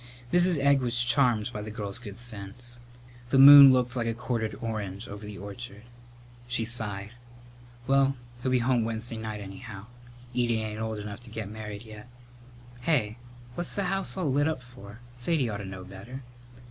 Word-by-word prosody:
Mrs. 175 Hz, -1 st, +4 dB
Egg 140 Hz, -1 st, +4 dB
was 120 Hz, -1 st, +2 dB
charmed 120 Hz, -3 st, +2 dB
by 105 Hz, -, -4 dB
the 105 Hz, -, -6 dB
girl's 105 Hz, 0 st, -2 dB
good 105 Hz, -5 st, -9 dB
sense. 120 Hz, +1 st, -5 dB, 0.5 s
The 135 Hz, -, +3 dB
moon 140 Hz, 0 st, +11 dB
looked 125 Hz, -1 st, +1 dB
like 120 Hz, -2 st, -1 dB
a 115 Hz, -, -1 dB
quartered 115 Hz, -3 st, -2 dB
orange 105 Hz, -2 st, -4 dB
over 100 Hz, +1 st, -9 dB
the 105 Hz, -1 st, -8 dB
orchard. 100 Hz, +1 st, -8 dB, 0.6 s
She 120 Hz, -2 st, 0 dB
sighed, 105 Hz, -3 st, -2 dB, 0.7 s
"Well, 135 Hz, 0 st, +3 dB, 0.3 s
he'll 130 Hz, -, -1 dB
be 130 Hz, -, +3 dB
home 120 Hz, -1 st, +2 dB
Wednesday 115 Hz, +1 st, -4 dB
night, 110 Hz, -1 st, -5 dB
anyhow. 95 Hz, +1 st, -9 dB, 0.5 s
Edie 120 Hz, -2 st, +1 dB
ain't 110 Hz, 0 st, -4 dB
old 110 Hz, -1 st, -3 dB
enough 105 Hz, -1 st, -7 dB
to 120 Hz, -1 st, -13 dB
get 110 Hz, -2 st, -6 dB
married 105 Hz, -1 st, -7 dB
yet. 110 Hz, +1 st, -12 dB, 0.7 s
Hey, 120 Hz, -5 st, 0 dB, 0.3 s
what's 175 Hz, +6 st, -4 dB
the 200 Hz, -, 0 dB
house 195 Hz, 0 st, 0 dB
all 165 Hz, -7 st, 0 dB
lit 145 Hz, +3 st, +2 dB
up 155 Hz, -5 st, -2 dB
for? 120 Hz, -3 st, -13 dB
Sadie 125 Hz, +1 st, 0 dB
ought 105 Hz, -, -3 dB
to 100 Hz, -, -7 dB
know 95 Hz, -1 st, -7 dB
better." 100 Hz, +8 st, -10 dB
115 Hz, 175 wpm, -28 LUFS, 105-125 Hz, 0.7 s, moon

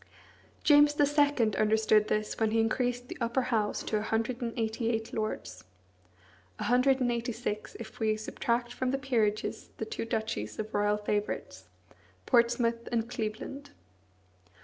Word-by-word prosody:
James 295 Hz, 0 st, +6 dB
II. 290 Hz, -6 st, +3 dB
understood 215 Hz, 0 st, +3 dB
this 215 Hz, 0 st, -1 dB
when 220 Hz, -1 st, +2 dB
he 225 Hz, +1 st, +1 dB
increased 245 Hz, +2 st, 0 dB
the -, -, -8 dB
Upper 235 Hz, +3 st, +1 dB
House 210 Hz, -2 st, 0 dB
to 215 Hz, -, -1 dB
a -, -, -1 dB
hundred 225 Hz, +3 st, -1 dB
and 235 Hz, -1 st, -2 dB
eighty 225 Hz, +1 st, -1 dB
eight 225 Hz, -1 st, -2 dB
lords; 215 Hz, -, -4 dB, 0.9 s
a -, -, -4 dB
hundred 255 Hz, +2 st, +3 dB
and 245 Hz, -2 st, +1 dB
eighty 235 Hz, 0 st, -2 dB
six 215 Hz, -2 st, -4 dB
if 220 Hz, -1 st, -9 dB
we 215 Hz, -1 st, +1 dB
subtract 240 Hz, +2 st, -2 dB
from 255 Hz, 0 st, -1 dB
the 270 Hz, -, +1 dB
peerages 225 Hz, -6 st, -1 dB
the 220 Hz, -, -3 dB
two 220 Hz, -, -4 dB
duchies 220 Hz, -, -3 dB
of 215 Hz, 0 st, -5 dB
royal 205 Hz, 0 st, +2 dB
favourites, 210 Hz, 0 st, -3 dB, 0.6 s
Portsmouth 235 Hz, -1 st, +2 dB
and 235 Hz, 0 st, -1 dB
Cleveland. 240 Hz, +6 st, -4 dB
230 Hz, 150 wpm, -30 LUFS, 215-245 Hz, 0.9 s, James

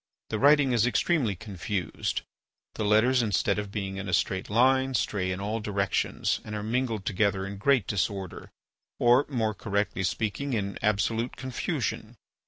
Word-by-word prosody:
The 110 Hz, -, -1 dB
writing 145 Hz, 0 st, +5 dB
is 120 Hz, -1 st, +3 dB
extremely 125 Hz, -, +1 dB
confused, 95 Hz, -1 st, -3 dB, 0.5 s
the -, -, -3 dB
letters 110 Hz, +5 st, +4 dB
instead 105 Hz, -2 st, +1 dB
of 105 Hz, -1 st, -5 dB
being 95 Hz, -2 st, -4 dB
in 100 Hz, 0 st, -5 dB
a 90 Hz, -, +3 dB
straight 95 Hz, +2 st, -1 dB
line, 130 Hz, +4 st, +3 dB
stray 95 Hz, -5 st, 0 dB
in 90 Hz, -, -3 dB
all 105 Hz, +3 st, -2 dB
directions 100 Hz, -2 st, -1 dB
and 105 Hz, -, -6 dB
are 105 Hz, -, -4 dB
mingled 115 Hz, -2 st, -1 dB
together 100 Hz, -1 st, +1 dB
in 100 Hz, +1 st, -6 dB
great 125 Hz, 0 st, +3 dB
disorder, 95 Hz, -2 st, -3 dB, 0.5 s
or, 120 Hz, +3 st, +4 dB
more 115 Hz, -6 st, 0 dB
correctly 100 Hz, -1 st, -2 dB
speaking, 110 Hz, +8 st, -2 dB
in 100 Hz, -3 st, -2 dB
absolute 110 Hz, +3 st, 0 dB
confusion. 130 Hz, -2 st, -3 dB
105 Hz, 155 wpm, -27 LUFS, 100-120 Hz, 0.5 s, writing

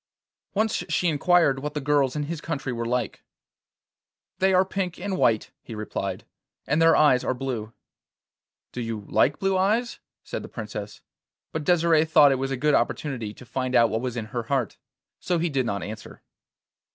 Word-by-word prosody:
Once 220 Hz, +2 st, +1 dB
she 180 Hz, -, +1 dB
inquired 160 Hz, -2 st, +3 dB
what 150 Hz, +2 st, -5 dB
the -, -, 0 dB
girls 140 Hz, -2 st, +1 dB
in 150 Hz, -, -1 dB
his 155 Hz, +1 st, -5 dB
country 140 Hz, -6 st, -3 dB
were 115 Hz, 0 st, -3 dB
like. 125 Hz, -2 st, -2 dB, 1.2 s
'They 190 Hz, 0 st, +3 dB
are 185 Hz, 0 st, +4 dB
pink 185 Hz, -2 st, -3 dB
and 195 Hz, +1 st, -2 dB
white,' 115 Hz, -, +2 dB
he 115 Hz, -, -9 dB
replied, 100 Hz, -3 st, -4 dB, 0.4 s
'and 150 Hz, +3 st, +1 dB
their 165 Hz, 0 st, +6 dB
eyes 145 Hz, -5 st, +4 dB
are -, -, -1 dB
blue.' 120 Hz, -4 st, -4 dB, 1.0 s
'Do 125 Hz, -, -5 dB
you 115 Hz, -2 st, -4 dB
like 145 Hz, -, +2 dB
blue 195 Hz, 0 st, 0 dB
eyes?' 215 Hz, +6 st, +1 dB, 0.2 s
said -, -, -5 dB
the -, -, -9 dB
Princess; -, -, -7 dB, 0.5 s
but 160 Hz, -, -3 dB
Desire 165 Hz, -2 st, +4 dB
thought 150 Hz, -3 st, +6 dB
it 135 Hz, -, 0 dB
was 135 Hz, -, -1 dB
a 135 Hz, -, -2 dB
good 150 Hz, +3 st, +2 dB
opportunity 120 Hz, -3 st, -1 dB
to 125 Hz, -, -13 dB
find 130 Hz, +1 st, -2 dB
out 115 Hz, -2 st, +5 dB
what 110 Hz, +1 st, -1 dB
was 125 Hz, -1 st, -3 dB
in 115 Hz, -, -3 dB
her 120 Hz, -, -1 dB
heart, 130 Hz, -6 st, -1 dB, 0.4 s
so 180 Hz, -, 0 dB
he 165 Hz, 0 st, 0 dB
did 130 Hz, -3 st, 0 dB
not 100 Hz, -4 st, -2 dB
answer. 110 Hz, +3 st, -9 dB
140 Hz, 185 wpm, -25 LUFS, 120-165 Hz, 1.2 s, their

